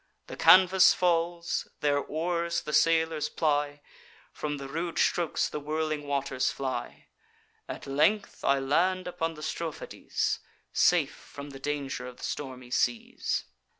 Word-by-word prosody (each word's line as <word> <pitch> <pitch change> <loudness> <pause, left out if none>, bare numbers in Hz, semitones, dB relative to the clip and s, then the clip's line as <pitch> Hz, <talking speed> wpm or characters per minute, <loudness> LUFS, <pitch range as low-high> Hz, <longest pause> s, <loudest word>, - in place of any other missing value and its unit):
The - - -8
canvas 185 0 +7
falls; 170 -1 0
their 145 -1 +2
oars 170 +3 -1
the 150 - -6
sailors 160 -2 +3
ply; 145 -2 0 0.5
From 150 -1 -4
the 140 -1 -7
rude 165 +4 -4
strokes 170 -3 +1
the - - -5
whirling 155 0 -2
waters 140 -2 0
fly. 130 -3 -4 0.6
At - - -6
length 155 +10 +1
I 140 - +3
land 175 +7 +1
upon 165 -2 -3
the 150 - -9
Strophades, 160 0 -3 0.3
Safe 155 -5 +3
from 140 0 -10
the 135 - -10
danger 140 -3 -3
of 125 - -10
the - - -12
stormy 130 -3 -5
seas. 120 -2 0
150 Hz, 135 wpm, -28 LUFS, 140-170 Hz, 0.6 s, canvas